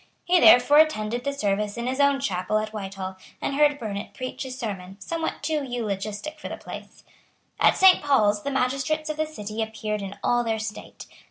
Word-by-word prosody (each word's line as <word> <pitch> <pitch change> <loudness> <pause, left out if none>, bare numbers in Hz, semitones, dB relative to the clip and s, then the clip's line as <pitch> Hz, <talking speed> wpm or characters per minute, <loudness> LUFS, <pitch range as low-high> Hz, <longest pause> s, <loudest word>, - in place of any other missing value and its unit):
He 360 0 +4
therefore 285 +1 +7
attended 245 -7 +2
the 280 - +1
service 210 -5 -1
in 235 - -3
his 260 +2 -2
own 280 -1 +4
chapel 190 -5 -1
at 215 0 -3
Whitehall, 190 -2 -6 0.2
and - - -2
heard 295 0 +3
Burnet 210 -5 -6
preach 255 +1 -5
a - - -6
sermon, 200 -7 -6
somewhat 325 +10 -4
too 310 -2 0
eulogistic 220 +3 -4
for - - -7
the - - -6
place. - - -10 0.6
At - - +4
Saint 380 -1 +7
Paul's 210 -8 +3
the 280 - -3
magistrates 275 +4 -1
of 305 - -7
the 310 0 0
City 215 -7 -5
appeared 215 -1 -3
in 195 0 -7
all 240 0 +2
their 225 -1 -1
state. 215 -1 -7
235 Hz, 190 wpm, -25 LUFS, 210-280 Hz, 0.6 s, therefore